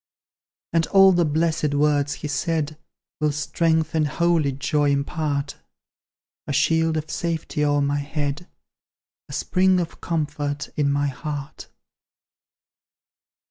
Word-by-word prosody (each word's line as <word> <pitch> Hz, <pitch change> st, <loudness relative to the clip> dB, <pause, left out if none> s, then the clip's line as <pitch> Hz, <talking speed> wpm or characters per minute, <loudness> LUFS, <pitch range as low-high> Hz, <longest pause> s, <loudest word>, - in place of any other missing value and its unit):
And 165 Hz, -1 st, +2 dB
all 195 Hz, -1 st, +7 dB
the 175 Hz, -2 st, +3 dB
blessed 155 Hz, -1 st, 0 dB
words 145 Hz, 0 st, +2 dB
He -, -, 0 dB
said 155 Hz, +1 st, -1 dB, 0.4 s
Will 150 Hz, -1 st, +2 dB
strength 160 Hz, +2 st, 0 dB
and 155 Hz, -2 st, +2 dB
holy 165 Hz, -1 st, +1 dB
joy 145 Hz, +2 st, 0 dB
impart: 140 Hz, 0 st, -1 dB, 0.9 s
A -, -, -2 dB
shield 160 Hz, +2 st, +2 dB
of 155 Hz, 0 st, -4 dB
safety 165 Hz, -3 st, -2 dB
o'er 145 Hz, 0 st, +2 dB
my 140 Hz, +1 st, 0 dB
head, 145 Hz, +3 st, -3 dB, 0.8 s
A -, -, -8 dB
spring 185 Hz, 0 st, +2 dB
of 170 Hz, -2 st, -5 dB
comfort 150 Hz, -3 st, -2 dB
in 145 Hz, -2 st, +1 dB
my 145 Hz, 0 st, +1 dB
heart. 145 Hz, +1 st, -6 dB
150 Hz, 120 wpm, -23 LUFS, 145-165 Hz, 0.9 s, all